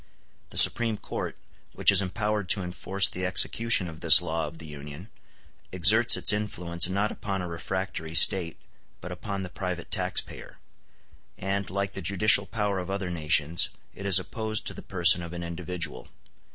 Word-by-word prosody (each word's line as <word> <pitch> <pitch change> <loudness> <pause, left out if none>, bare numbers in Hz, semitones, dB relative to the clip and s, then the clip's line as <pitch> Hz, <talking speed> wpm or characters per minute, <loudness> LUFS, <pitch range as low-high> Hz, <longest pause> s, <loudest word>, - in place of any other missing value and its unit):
The - - -6
Supreme 115 -2 +8
Court, - - -7 0.4
which - - +2
is 100 0 +4
empowered 105 0 -4
to 100 -1 +2
enforce 95 +2 0
the 90 - -7
execution 95 +2 +2
of 80 -2 -11
this 80 +1 +7
law 80 -2 -4
of 80 +2 -12
the 80 - -10
Union, 75 +6 -11 0.6
exerts 100 +6 +5
its - - +5
influence 90 -5 -1
not 100 +3 -2
upon 95 -3 -6
a - - -6
refractory 85 -1 -6
State, 85 -1 +2 0.4
but 90 - -10
upon 100 +2 -7
the 95 - -8
private 90 -2 -7
taxpayer; - - -5 0.8
and, 95 0 -4
like 100 +1 -4
the 100 - -8
judicial 100 +3 +2
power 105 -3 -3
of 90 +1 -8
other 95 -2 -5
nations, 80 0 0 0.2
it 100 - -8
is 95 -3 +7
opposed 110 +2 -5
to - - -4
the - - -11
person 85 -2 +1
of 85 0 -9
an 85 0 -7
individual. 85 -6 -7
90 Hz, 165 wpm, -25 LUFS, 85-100 Hz, 0.8 s, Supreme